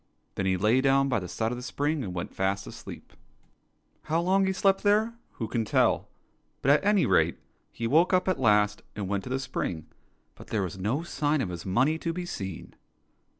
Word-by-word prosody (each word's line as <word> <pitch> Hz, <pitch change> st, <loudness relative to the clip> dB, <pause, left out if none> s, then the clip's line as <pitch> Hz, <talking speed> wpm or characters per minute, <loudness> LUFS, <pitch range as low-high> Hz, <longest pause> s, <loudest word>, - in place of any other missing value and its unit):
Then 95 Hz, -, -2 dB
he 95 Hz, -1 st, +2 dB
lay 110 Hz, +7 st, +3 dB
down 135 Hz, 0 st, +3 dB
by 120 Hz, -4 st, +1 dB
the 90 Hz, -, -6 dB
side 110 Hz, +5 st, -2 dB
of 125 Hz, -, -3 dB
the -, -, -8 dB
spring 145 Hz, +4 st, -1 dB
and 95 Hz, -, -4 dB
went 85 Hz, -1 st, -5 dB
fast 100 Hz, +1 st, -1 dB
asleep. -, -, -10 dB, 0.9 s
How 160 Hz, +2 st, +1 dB
long 190 Hz, +3 st, +2 dB
he -, -, +2 dB
slept 195 Hz, 0 st, +2 dB
there, 215 Hz, +3 st, +2 dB, 0.2 s
who 115 Hz, -, -4 dB
can 115 Hz, +1 st, -1 dB
tell 110 Hz, -, +2 dB, 0.3 s
} -, -, -44 dB
but 135 Hz, -, +5 dB
at 150 Hz, -, +4 dB
any 205 Hz, -2 st, +3 dB
rate 80 Hz, +1 st, +3 dB, 0.3 s
he 115 Hz, -, -5 dB
woke 160 Hz, +9 st, +4 dB
up 185 Hz, 0 st, +2 dB
at 185 Hz, -6 st, +1 dB
last 105 Hz, -3 st, +3 dB
and 100 Hz, -2 st, -4 dB
went 100 Hz, 0 st, -2 dB
to -, -, -6 dB
the 130 Hz, -, 0 dB
spring, 125 Hz, -, -4 dB, 0.5 s
but -, -, -14 dB
there 105 Hz, -3 st, -1 dB
was 95 Hz, +1 st, -5 dB
no 115 Hz, -, -1 dB
sign 150 Hz, -3 st, 0 dB
of 110 Hz, -, -1 dB
his 85 Hz, +1 st, -6 dB
money 130 Hz, +12 st, +2 dB
to 165 Hz, -, -2 dB
be 180 Hz, +1 st, -4 dB
seen. 95 Hz, -, -6 dB
125 Hz, 215 wpm, -27 LUFS, 100-165 Hz, 0.9 s, but